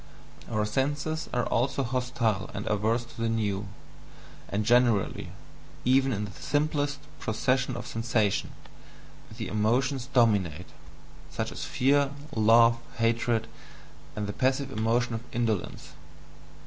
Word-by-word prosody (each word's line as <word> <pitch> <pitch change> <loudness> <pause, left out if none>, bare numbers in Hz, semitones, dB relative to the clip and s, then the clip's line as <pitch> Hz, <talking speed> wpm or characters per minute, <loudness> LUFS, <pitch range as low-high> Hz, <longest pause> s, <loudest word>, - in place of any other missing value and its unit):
Our 105 0 0
senses 145 +7 -1
are 125 -1 0
also 135 +3 0
hostile 120 -5 -1
and 100 - -4
averse 110 +3 +1
to 115 - -10
the 115 - +1
new; 105 -3 -1 0.8
and 105 +1 -1
generally, 120 -3 +2 0.5
even 135 +2 +4
in 105 -2 -1
the 100 - -9
"simplest" 145 - -1 0.2
processes 125 +3 0
of 120 0 -5
sensation, 115 -3 0 0.9
the 110 -4 -4
emotions 125 +6 +1
DOMINATE 100 - +2 0.6
such - - -3
as - - -5
fear, 140 +2 +2 0.3
love, 115 +2 +5 0.2
hatred, 115 0 +1 0.7
and 105 - -2
the 100 - -4
passive 135 +3 0
emotion 115 +2 +1
of 115 - -3
indolence. 110 -8 -2
115 Hz, 120 wpm, -28 LUFS, 105-130 Hz, 0.9 s, love